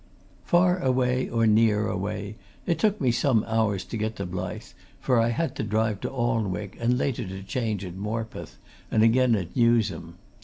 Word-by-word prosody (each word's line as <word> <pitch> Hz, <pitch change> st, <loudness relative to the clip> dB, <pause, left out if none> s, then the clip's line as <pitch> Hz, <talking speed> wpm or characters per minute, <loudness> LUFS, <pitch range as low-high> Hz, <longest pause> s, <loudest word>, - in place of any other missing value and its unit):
Far 180 Hz, +1 st, +3 dB
away 130 Hz, -3 st, +1 dB
or 115 Hz, -1 st, +1 dB
near 110 Hz, -1 st, +3 dB
away, 100 Hz, +1 st, -4 dB, 0.3 s
it 170 Hz, -, 0 dB
took 215 Hz, -1 st, +2 dB
me 130 Hz, -3 st, +2 dB
some 115 Hz, -1 st, +2 dB
hours 110 Hz, -4 st, 0 dB
to 115 Hz, -, -5 dB
get 110 Hz, +1 st, -2 dB
to 100 Hz, -, -4 dB
Blyth, 90 Hz, 0 st, -6 dB, 0.3 s
for 125 Hz, -2 st, +2 dB
I 115 Hz, +1 st, +3 dB
had 160 Hz, +8 st, -1 dB
to -, -, -2 dB
drive 110 Hz, -1 st, 0 dB
to -, -, -2 dB
Alnwick, 110 Hz, -7 st, -2 dB
and 120 Hz, +1 st, +1 dB
later 125 Hz, -5 st, -1 dB
to 95 Hz, +1 st, -7 dB
change 105 Hz, -1 st, -2 dB
at 90 Hz, -, -7 dB
Morpeth, 110 Hz, +3 st, -5 dB, 0.3 s
and 110 Hz, -, +3 dB
again 120 Hz, +1 st, +4 dB
at 90 Hz, -4 st, -4 dB
Newsham. 110 Hz, -8 st, +1 dB
110 Hz, 180 wpm, -26 LUFS, 100-125 Hz, 0.3 s, again